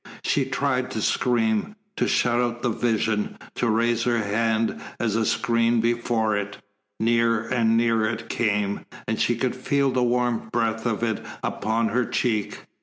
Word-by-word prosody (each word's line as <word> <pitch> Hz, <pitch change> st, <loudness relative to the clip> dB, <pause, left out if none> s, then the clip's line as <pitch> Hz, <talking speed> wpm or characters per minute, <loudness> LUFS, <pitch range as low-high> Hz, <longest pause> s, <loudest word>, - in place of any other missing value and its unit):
She 140 Hz, -, +1 dB
tried 130 Hz, -1 st, -1 dB
to -, -, -1 dB
scream, 115 Hz, -, +1 dB, 0.2 s
to -, -, 0 dB
shut 120 Hz, -1 st, +2 dB
out 120 Hz, -1 st, -2 dB
the 120 Hz, -, +1 dB
vision, 110 Hz, -2 st, 0 dB, 0.2 s
to 120 Hz, -, 0 dB
raise 115 Hz, +1 st, +2 dB
her 120 Hz, -1 st, +2 dB
hand 110 Hz, +1 st, 0 dB, 0.2 s
as 110 Hz, -3 st, 0 dB
a 110 Hz, -1 st, +1 dB
screen 115 Hz, -1 st, +2 dB
before 115 Hz, -2 st, +1 dB
it. 105 Hz, 0 st, -3 dB, 0.4 s
Nearer 115 Hz, 0 st, +2 dB
and 115 Hz, -1 st, +2 dB
nearer 115 Hz, -2 st, +2 dB
it 115 Hz, 0 st, -5 dB
came, 105 Hz, -3 st, -1 dB, 0.2 s
and 110 Hz, -, -1 dB
she 120 Hz, -, +2 dB
could 125 Hz, +2 st, -1 dB
feel 140 Hz, +1 st, +1 dB
the 130 Hz, 0 st, +1 dB
warm 120 Hz, -2 st, 0 dB
breath 115 Hz, 0 st, 0 dB
of 115 Hz, -1 st, -1 dB
it 110 Hz, -3 st, -1 dB, 0.2 s
upon 110 Hz, +1 st, 0 dB
her 125 Hz, +4 st, +1 dB
cheek. 110 Hz, -4 st, -1 dB
115 Hz, 165 wpm, -24 LUFS, 110-120 Hz, 0.4 s, shut